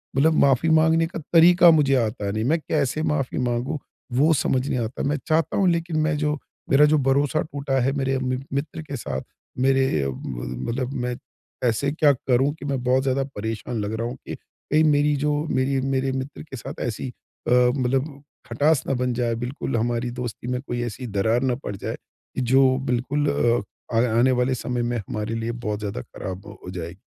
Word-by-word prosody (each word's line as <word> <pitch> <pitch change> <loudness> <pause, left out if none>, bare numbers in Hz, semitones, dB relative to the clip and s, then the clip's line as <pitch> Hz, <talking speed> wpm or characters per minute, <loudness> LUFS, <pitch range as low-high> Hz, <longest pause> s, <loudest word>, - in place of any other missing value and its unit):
मतलब 160 +4 +4
माफ़ी 140 +4 +4
माँगने 160 +1 +4
का 170 - -6
तरीक़ा 175 +1 +7
मुझे 140 -4 +4
आता 110 -4 -1
नहीं। 110 +1 -1
मैं 160 +4 +2
कैसे 150 -1 -1
माफ़ी 135 -4 -1
माँगूँ, 125 +4 -1 0.4
वो 150 +6 +4
समझ 135 -2 +1
नहीं 125 - 0
आता 115 +2 -3
मैं 145 - +1
चाहता 160 -1 +1
हूँ, 195 -2 +3
लेकिन 170 -1 -1
मैं 160 -1 +1
जो 150 0 0 0.3
मेरा 145 +2 +6
जो - - +5
भरोसा 145 +3 +2
टूटा 140 -3 -2
है 135 +2 +2
मेरे 135 0 0
म 130 0 -1
मित्र 150 +3 -3
के 145 -3 -6
साथ 65 - -4 0.4
मेरे 135 0 +4 0.2
अ - - -2
अ, - - -1
मतलब 65 - -4
मैं 125 0 -2 0.5
ऐसे 130 +5 +1
क्या 150 -1 +4
करूँ 130 +2 +1
कि - - -7
मैं 135 -3 -1
बहुत 130 +1 +2
ज़्यादा 135 0 +1
परेशान 110 +2 -3
लग 105 +2 -3
रहा 115 +1 -2
हूँ 125 - -5
कि - - -4
कहीं 155 +2 -1
मेरी 145 -1 +3
जो 150 0 +2 0.2
मेरी 130 +1 +1
मेरे 135 0 +1
मित्र 130 +2 -5
के 135 -4 -9
साथ - - -8
ऐसी 120 +2 -3 0.4
अ, - - +1
मतलब 130 +3 +2 0.3
खटास 150 0 +2
ना 135 - +1
बन 125 -1 +1
जाए, 120 -1 0
बिल्कुल 130 -1 -3
हमारी 120 +1 -1
दोस्ती 120 -1 -5
में 125 - -1
कोई 120 -3 -4
ऐसी 120 +2 -5
दरार 110 +5 +2
ना 120 - +1
पड़ 100 - -3
जाए, 95 - -5 0.4
जो 130 +1 +4
बिल्कुल 140 +4 0
अ, 120 -2 0
आने 120 +3 +3
वाले 130 +1 +1
समय 125 0 -2
में 120 - -1
हमारे 105 +1 -4
लिए 115 +1 -2 0.2
बहुत 105 0 -1
ज़्यादा 100 -11 -4
ख़राब 95 +7 -7 0.2
हो - - -8
जाए। 85 +1 -5
130 Hz, 195 wpm, -24 LUFS, 120-145 Hz, 0.5 s, तरीक़ा